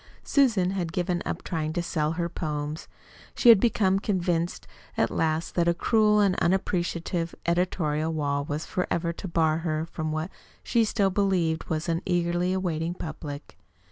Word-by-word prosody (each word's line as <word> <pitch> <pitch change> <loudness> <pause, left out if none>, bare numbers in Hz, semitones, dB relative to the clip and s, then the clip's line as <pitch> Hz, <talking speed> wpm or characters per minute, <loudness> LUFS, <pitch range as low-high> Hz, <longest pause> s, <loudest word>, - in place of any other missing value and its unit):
Susan 220 -10 +3
had 180 -4 -2
given 175 0 -1
up - - -4
trying 155 -2 -2
to 175 +1 -2
sell 155 -2 -1
her 170 +1 -1
"poems." 150 -2 -4 0.5
She 245 - +5
had 225 -4 +9
become 195 -4 +2
convinced 175 -4 -1 0.3
at - - +2
last 160 +1 -1
that 170 -1 +1
a 170 - +3
cruel 210 +2 +3
and 195 -2 +3
unappreciative 175 -2 -1
editorial 165 -3 0
wall 145 -2 -1
was 150 +2 -4
forever 170 -2 -1
to 190 - -7
bar 160 -2 +2
her 160 -1 -2
from 160 -1 -4
what 155 +4 -3 0.3
she 230 -2 +2
still 200 -3 +1
believed 180 -5 +1
was 160 +2 -2
an 165 0 0
eagerly 175 0 +1
awaiting 175 -3 -1
public. 150 -3 -7
170 Hz, 160 wpm, -26 LUFS, 160-185 Hz, 0.5 s, had